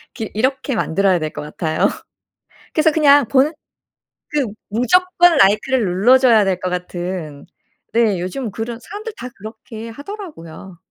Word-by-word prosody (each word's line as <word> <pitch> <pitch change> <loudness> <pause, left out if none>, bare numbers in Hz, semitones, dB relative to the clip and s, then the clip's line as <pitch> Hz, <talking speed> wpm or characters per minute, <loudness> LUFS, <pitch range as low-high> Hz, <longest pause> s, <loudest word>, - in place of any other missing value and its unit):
기 220 - -5
이렇게 260 +4 -1
만들어야 190 -2 +1
될 155 -1 -3
것 - - -7
같아요. 155 +1 -1 0.8
그래서 315 0 +3
그냥 290 -4 +5
보는 275 +4 +3 0.8
그 290 -5 0 0.2
무조건 350 - +3
라이크를 215 +3 +3
눌러줘야 225 +4 +4
될 190 -2 0
것 185 - -3
같은. 175 -4 -5 0.5
네 220 -6 +2
요즘 210 +6 -4
그런 230 +3 -5
사람들 425 +2 -8
다 250 +1 -7
그렇게 220 +1 -10
하더라고요. 230 - -10
225 Hz, 290 characters per minute, -19 LUFS, 185-275 Hz, 0.8 s, 그냥